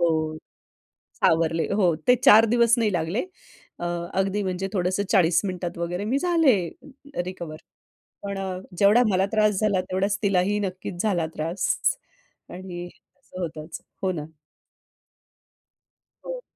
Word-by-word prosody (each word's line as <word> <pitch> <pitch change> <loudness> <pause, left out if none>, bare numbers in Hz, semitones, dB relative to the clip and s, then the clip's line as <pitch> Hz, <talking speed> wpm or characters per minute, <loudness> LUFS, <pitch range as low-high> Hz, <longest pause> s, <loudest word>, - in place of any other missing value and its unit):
हो 160 -2 +1 0.9
सावरले 165 0 +2
हो 180 -5 +3
ते 250 - +8
4 225 -4 +8
दिवस 235 -1 +5
नाही 215 -3 +1
लागले 175 - -1 0.5
अ, 175 - -5 0.3
अगदी 195 +2 0
म्हणजे 190 0 -2
थोडंसं 185 +1 0
40 175 -4 +4
मिनिटात 180 -3 -4
वगैरे 175 +3 -3
मी 255 +6 +1
झाले, 330 - +4 0.7
रिकव्हर. 170 -4 -7 0.7
पण 200 -1 -4
अ, 190 -1 -3 0.2
जेवढा 210 +5 +6
मला 190 +1 +2
त्रास 215 -3 +3
झाला 200 -3 +2
तेवढाच 195 +2 0
तिलाही 200 +1 +2
नक्कीच 185 -2 -4
झाला 180 -7 +1
त्रास 165 +4 -2 0.8
आणि 175 -1 -7
असं 185 +1 -14
होतंच. 160 -1 -6 0.2
हो 185 -1 +1
ना. 155 -4 -5 2.0
हो. - - -5
185 Hz, 125 wpm, -24 LUFS, 175-205 Hz, 2.0 s, ते